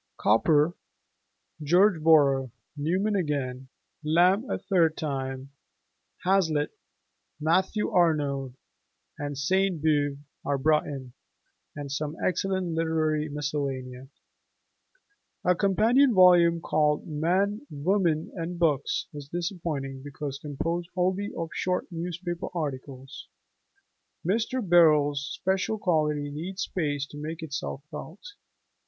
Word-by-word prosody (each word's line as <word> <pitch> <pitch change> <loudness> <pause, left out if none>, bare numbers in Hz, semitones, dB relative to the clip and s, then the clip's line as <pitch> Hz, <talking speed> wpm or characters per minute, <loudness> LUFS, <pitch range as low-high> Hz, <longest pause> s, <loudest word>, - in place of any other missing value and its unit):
Cowper, 150 +9 +3 0.9
George 175 +3 +4
Borrow, 140 -5 +4 0.3
Newman 185 +8 0
again, 135 -7 -2 0.4
Lamb 180 +9 +3
a - - -1
third 165 -5 +1
time 135 -4 -2
(and 130 0 -8
fresh 140 0 -30 0.8
as 175 -4 0
ever), 155 -2 +1
Hazlitt, - - -12 0.6
Matthew 185 +7 +1
Arnold, 145 -7 +1 0.6
and 145 -1 -4
Sainte 185 +4 +1
Beuve 145 -2 +1 0.3
are 140 0 0
brought 150 +3 +2
in, 130 -4 -7 0.6
and 145 -2 -6
some 150 +2 -3
excellent 185 -2 -1
literary 155 -2 0
miscellanea. 135 -3 -4 1.4
A 180 - +5
companion 220 +8 +3
volume 175 -2 +6
called 150 -2 +1
'Men, 190 - 0
Women, 165 +1 0
and 175 0 -5
Books' 150 -5 +1
is 145 -1 -9
disappointing 165 -6 -4
because 140 0 -6
composed 165 +4 -3
wholly 185 +3 0
of 165 -1 -4
short 180 0 -1
newspaper 175 +1 -4
articles: 135 -3 -6 1.0
Mr. 225 +4 0
Birrell's 150 -5 +5
special 190 +3 -1
quality 150 -6 0
needs 185 +6 -4
space 145 -5 -2
to 145 0 -10
make 160 +2 -5
itself 140 -2 -5
felt. 160 +5 -8
155 Hz, 110 wpm, -27 LUFS, 145-180 Hz, 1.4 s, volume